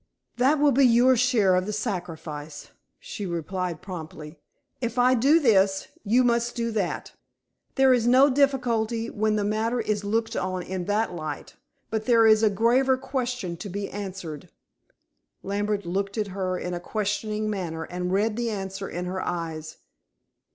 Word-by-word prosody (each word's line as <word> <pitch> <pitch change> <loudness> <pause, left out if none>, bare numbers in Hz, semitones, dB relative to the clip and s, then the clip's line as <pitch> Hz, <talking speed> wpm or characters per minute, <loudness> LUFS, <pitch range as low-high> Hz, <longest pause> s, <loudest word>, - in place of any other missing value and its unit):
"That 265 +5 +3
will 290 0 +4
be 275 +2 +4
your 245 +2 +5
share 230 -6 +3
of 185 +1 0
the - - -2
sacrifice," 165 -8 -5 0.3
she 205 -3 -6
replied 175 0 -3
promptly. 160 -4 -8 0.4
"If 235 0 -3
I 250 +1 +5
do 275 +7 +4
this, 195 -8 +3
you 235 +4 +3
must 235 0 +1
do 230 -1 -1
that. 205 -5 -2 0.6
There 265 -1 +5
is 240 -2 +1
no 260 +3 +6
difficulty 245 -5 +1
when 215 0 0
the 210 - 0
matter 220 +4 0
is 215 -2 -1
looked 225 +2 -1
on 185 -1 -2
in 185 -1 -4
that 205 0 0
light. 155 -3 -6 0.4
But 220 -1 -2
there 230 -2 +5
is 220 -1 +6
a 220 - +4
graver 245 +6 +3
question 250 -9 -3
to 200 - -7
be 200 +2 -4
answered." 190 -7 -7 0.9
Lambert 205 0 -2
looked 195 +4 -2
at 210 -2 -1
her 185 -1 -2
in 180 0 -4
a 175 - -3
questioning 215 +2 -2
manner 175 -6 -3
and 180 +1 -4
read 210 +3 +1
the 240 -1 -1
answer 195 -2 -5
in 175 +1 -4
her 185 +1 -3
eyes. 160 -2 -4
210 Hz, 165 wpm, -25 LUFS, 185-235 Hz, 0.9 s, no